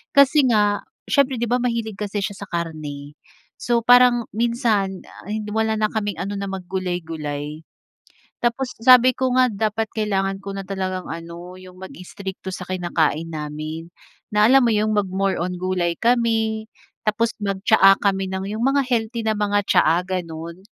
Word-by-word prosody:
Kasi 280 0 +6
nga, 210 -3 +3 0.3
siyempre 275 -2 +2
'di 235 - -1
ba, 245 +1 +2
mahilig 230 -4 -2
kasi 205 0 -3
siya 200 -2 -3
sa 200 - -7
karne. 150 -4 -5 0.4
So, 240 -1 +1
parang 245 -1 +5
minsan, 225 -5 0
ah, - - -14 0.2
wala 220 0 +1
na 215 - +3
kaming 205 -5 -3
ano 200 +2 -3
na 200 - -3
mag-gulay-gulay. 165 -5 -4 0.8
Tapos 245 +2 -1
sabi 255 0 +7
ko 260 -1 0
nga, 255 0 +5
dapat 220 0 -1
kailangan 195 -3 -1
ko 195 - -6
na 195 - -5
talagang 185 -2 -3
ano, 170 +2 -8
yung 185 0 -14
mag-strikto 190 +1 -8
sa 185 0 -6
kinakain 165 -3 -1
namin, 155 +2 -6 0.5
na, 210 0 +4
alam 270 -1 +6
mo 235 - +3
yun, 215 +1 +1
mag-more 195 -2 0
on 180 +1 -2
gulay 180 -1 -1
kami. 225 -1 +1 0.4
Tapos 225 +2 +1
mag-tsaa 195 0 +4
kami 195 -1 +1
ng, 190 0 -4
yung 220 +2 -3
mga 275 +1 +3
healthy 235 -2 -1
na 220 -1 0
mga 205 -1 +1
tsaa, 170 -2 +3
ganun. 170 -2 -5
200 Hz, 155 wpm, -22 LUFS, 180-225 Hz, 0.8 s, sabi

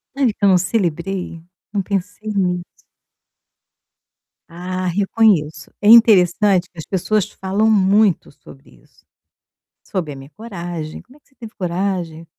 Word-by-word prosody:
Sabe 265 -5 +1
que 205 - -14
eu - - +6
não 185 - +5
celebrei? 180 -2 -2 0.3
Não 200 - 0
pensei 200 +2 -4
nisso. 180 -3 -1 1.9
Ah, 185 +2 -5
reconheço. 180 -5 +1
É 205 - +3
interessante 195 -4 +5
que 170 - -28
as 160 - -7
pessoas 205 +2 -1
falam 200 +3 -1
muito 205 -2 +2
sobre 140 0 -17
isso. - - -29 0.8
Sobre 165 -7 -4
a - - -10
minha 135 0 -12
coragem, 175 -6 -7
"Como 260 +4 -21
é - - -26
que - - -38
você 270 - -33
teve 225 -3 -11
coragem?" 175 -3 -3
190 Hz, 140 wpm, -19 LUFS, 170-210 Hz, 1.9 s, eu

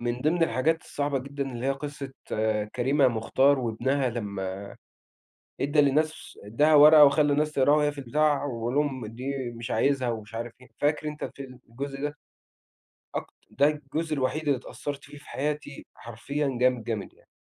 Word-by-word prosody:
من 120 +1 -2
ضمن 165 +5 +1
الحاجات 160 +3 +1
الصعبة 145 -1 -2
جدًا 140 0 -5
اللي 120 +2 -4
هي - - +2
قصّة 140 0 -5 0.6
كريمة 135 +2 +3
مختار 130 +4 +2
وابنها 130 +3 0
لمّا 100 -4 -4 1.0
ادّى 145 +2 +3
للناس 155 +3 0
ادّاها 145 +10 +3
ورقة 150 +1 +9
وخلّى 145 +1 +3
الناس 150 +1 +1
تقراها 145 0 +4
وهي 150 -1 +2
في 145 - -15
البتاع 145 +3 +1
ويقول 120 -2 -3
لهم 140 -5 0
دي 115 +4 -8 0.3
مش 115 +1 -6
عايزها 135 -3 +1
ومش 110 -1 -5
عارف 115 0 -5
إيه، 125 - -15
فاكر 150 +1 +1
أنت 150 0 -5
الفيلم 130 -2 -8
الجزء 135 +3 -6
ده؟ 145 0 -3 1.0
أكت - - -4 0.2
ده 140 +1 +3
الجزء 155 +2 -3
الوحيد 140 +2 -1
اللي 140 -2 +3
اتأثّرت 140 +2 -7
فيه 145 - -12
في - - -16
حياتي 150 0 -4
حرفيًا 135 +4 -3
جامد، 125 -2 +3
جامد، 110 -3 -4
يعني، - - -27
140 Hz, 165 wpm, -27 LUFS, 120-145 Hz, 1.0 s, ورقة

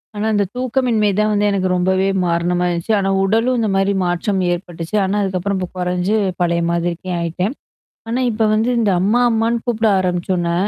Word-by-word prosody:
ஆனா, 210 +1 -2
இந்த 205 -1 +2
தூக்கமின்மை 250 -4 +1
தான் 215 0 +2
வந்து 205 0 +1
எனக்கு 195 -2 0
ரொம்பவே 185 +1 +1 0.2
காரணமாயிருச்சு 175 +2 0
ஆனா, 195 0 0
உடலும் 225 +6 +1
இந்த 220 -2 0
மாரி 195 +1 +2
மாற்றம் 175 +3 -1
ஏற்பட்டுச்சு. 170 0 -6
ஆனா, 190 +1 -1
அதுக்கப்புறம் 190 +1 -2
இப்ப 185 - -3
குறைஞ்சு 180 +3 0 0.3
பழைய 170 -1 +1
மாதிரிக்கே 170 +1 -2
ஆயிட்டேன். 175 +6 -2 0.6
ஆனா, 240 +3 -1
இப்ப 220 0 0
வந்து, 220 +3 +1
இந்த 215 -3 +2
அம்மா 210 +6 +2
அம்மான்னு 225 +1 +1
கூப்பிட 225 -2 +1
ஆரம்பிச்சோனே, 175 -1 -1
195 Hz, 165 wpm, -18 LUFS, 175-220 Hz, 0.6 s, இந்த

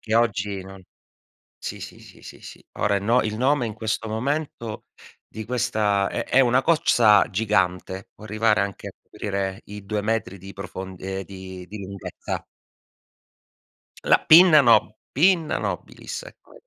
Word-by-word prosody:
che 110 0 -3
oggi 105 -4 0
non 95 0 -12 0.8
sì, - - -6
sì, - - -9
sì, - - -16
sì. - - -12
Ora 100 0 +2
i - - -1
no 115 +5 +3
il 110 0 -3
nome 130 +1 +2
in 110 - -5
questo 110 0 -3
momento 115 -1 -3 0.4
di 110 - -7
questa 105 -4 0
è - - -3
è 135 - +3
una 125 0 +3
cozza 115 -10 +4
gigante, 95 -2 -1
può 110 - -14
arrivare 110 0 +1
anche 100 -1 -5
a - - -11
coprire 95 -1 -4
i 105 0 -9
2 105 +1 -1
metri 110 -2 -2
di 95 +2 -11
profond 95 -1 -8
ehm, 95 0 -4
di 95 -2 -10
di 105 +1 -8
lunghezza. 100 -1 -6 1.6
La - - +5
pinna 160 -2 +8
no 110 -4 +4
Pinna 170 +1 +2
nobilis, - - -5
ecco, - - -16
105 Hz, 150 wpm, -23 LUFS, 100-120 Hz, 1.6 s, pinna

